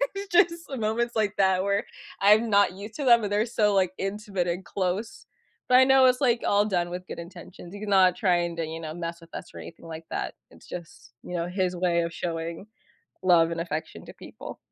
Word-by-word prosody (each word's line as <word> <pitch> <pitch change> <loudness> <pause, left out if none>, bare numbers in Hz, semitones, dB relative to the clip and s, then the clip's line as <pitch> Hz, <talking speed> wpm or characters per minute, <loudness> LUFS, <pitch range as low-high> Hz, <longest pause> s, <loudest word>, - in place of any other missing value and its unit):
it's 400 +1 -5 0.2
just 335 0 -11
moments 230 +2 -1
like 210 -2 0
that 190 -1 +3
where 200 +1 0 0.4
I'm 210 +3 +5
not 200 -3 +4
used 205 +3 -10
to 285 - -4
them, 235 -3 +6
and 205 - -3
they're 210 +2 +2
so, 210 -3 +1
like, 185 -2 +2
intimate 195 -2 -3
and 175 +2 -2
close, 190 +5 -3 0.4
but 250 - +7
I - - +8
know 265 0 +6
it's, 255 +1 +3
like, 240 -3 +2
all 205 +1 +3
done 175 -4 -1
with 180 +1 -6
good - - -7
intentions. 175 +1 -11
He's 205 +1 -7
not 190 -3 +4
trying 175 -3 +1
to, 165 - -1
you 160 +1 -6
know, 155 -1 -6
mess 170 0 -6
with 165 0 -17
us - - -8
or - - -9
anything 165 - -11
like 160 0 -8
that. - - -3 0.2
It's - - -18
just, 165 -8 -10
you 180 - -6
know, 170 0 -2
his 180 0 -1
way 175 -1 +1
of 170 0 -3
showing 165 +3 -5 0.6
love 170 -3 +4
and 165 - -3
affection 160 -2 -5
to - - -11
people. - - -10
190 Hz, 220 wpm, -26 LUFS, 170-215 Hz, 0.6 s, I